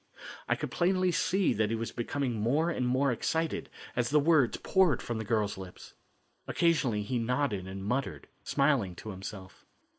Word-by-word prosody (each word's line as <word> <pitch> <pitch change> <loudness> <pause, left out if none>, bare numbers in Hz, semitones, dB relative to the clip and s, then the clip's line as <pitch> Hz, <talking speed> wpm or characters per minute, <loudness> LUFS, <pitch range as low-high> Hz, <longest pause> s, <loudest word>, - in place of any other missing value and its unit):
I - - +3
could - - -5
plainly 185 +1 +2
see 185 0 +2
that 110 -1 +1
he 115 - 0
was 115 0 -4
becoming 125 +2 -2
more 150 +10 +2
and 125 -6 -1
more 130 +2 +2
excited 160 +7 -1 0.3
as 120 -1 +1
the 150 - +4
words 150 -5 +3
poured 185 -8 +3
from 120 -2 -4
the - - -3
girl's 105 -2 0
lips. 95 -2 -10 0.5
Occasionally 135 -11 +1
he 120 +3 -1
nodded 115 -5 -1
and 95 +1 -6
muttered, 125 +5 -2 0.2
smiling 140 -10 +1
to 110 - -7
himself. 95 0 -9
125 Hz, 170 wpm, -30 LUFS, 105-150 Hz, 0.5 s, the